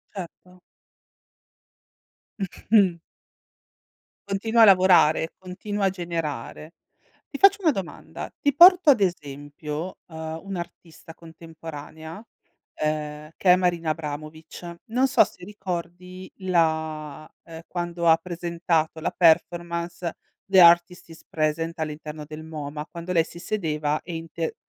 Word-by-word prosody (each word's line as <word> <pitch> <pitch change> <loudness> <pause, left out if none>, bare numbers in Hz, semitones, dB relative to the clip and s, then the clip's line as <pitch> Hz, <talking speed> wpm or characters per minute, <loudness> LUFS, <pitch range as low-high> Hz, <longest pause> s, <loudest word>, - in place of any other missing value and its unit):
Certo. 180 0 -10 1.8
Mh-mh. 195 -2 +2 1.3
Continua 220 +4 +1
a - - +10
lavorare, 180 -5 +5
continua 195 +2 -4
a - - +4
generare. 165 -3 -5 0.5
Ti 280 - -6
faccio 400 +1 +6
una 330 -4 +4
domanda, 195 -9 -7
ti 285 -1 +1
porto 355 0 +8
ad 225 -6 +2
esempio, 150 0 -4
ehm, 160 -1 -6
un'artista 170 -3 -8
contemporanea, 160 +1 -10 0.5
ehm, 150 0 -3
che 180 - +3
è - - +8
Marina 175 -3 0
Abramovic. 155 +2 -6
Non 250 +4 +1
so - - +6
se - - -15
ricordi 185 -1 -7
la, 160 -4 -1
ehm, 165 -1 -10
quando 175 -1 -3
ha 160 - +8
presentato 170 -2 -2
la - - -1
performance 170 0 +1 0.3
"The 195 -1 +4
Artist 170 0 +5
is 165 - -14
Present" 160 +1 -1
all'interno 150 0 -5
del 155 +1 -9
MOMA, 150 -1 -6
quando 170 +2 -7
lei 165 -2 +3
si 170 - -12
sedeva 155 -6 -2
e 170 -1 -7
inte 165 0 -5
170 Hz, 115 wpm, -24 LUFS, 155-185 Hz, 1.8 s, a